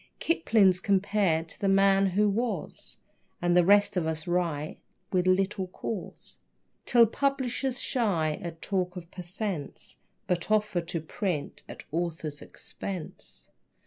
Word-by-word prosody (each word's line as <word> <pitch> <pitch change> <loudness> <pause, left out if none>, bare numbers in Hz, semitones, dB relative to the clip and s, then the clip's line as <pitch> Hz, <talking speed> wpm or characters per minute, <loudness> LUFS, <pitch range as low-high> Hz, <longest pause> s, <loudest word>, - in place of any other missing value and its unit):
Kipling's 210 - +4
compared 190 -4 +2
to - - -8
"The 200 - 0
Man 195 0 +5
Who 205 +3 +2
Was," 210 -3 -2 0.4
And 175 0 +2
the 180 - +6
rest 205 +3 +5
of 170 -3 +1
us 160 0 -2
write 170 -4 -1 0.3
with 185 -1 +2
little 190 0 +2
cause, 185 +1 -6 0.5
Till 235 -1 +7
publishers 265 +1 -1
shy 170 -11 0
at 165 -2 -7
talk 185 -2 -1
of 175 -1 -9
per 185 - -7
cents., 180 -3 -4 0.3
But 175 +1 -1
offer 210 -4 +2
to 170 -1 -4
print 160 -1 -3
"at - - -8
author's 160 -2 -3
expense." 185 -5 -5
185 Hz, 135 wpm, -28 LUFS, 170-205 Hz, 0.5 s, Till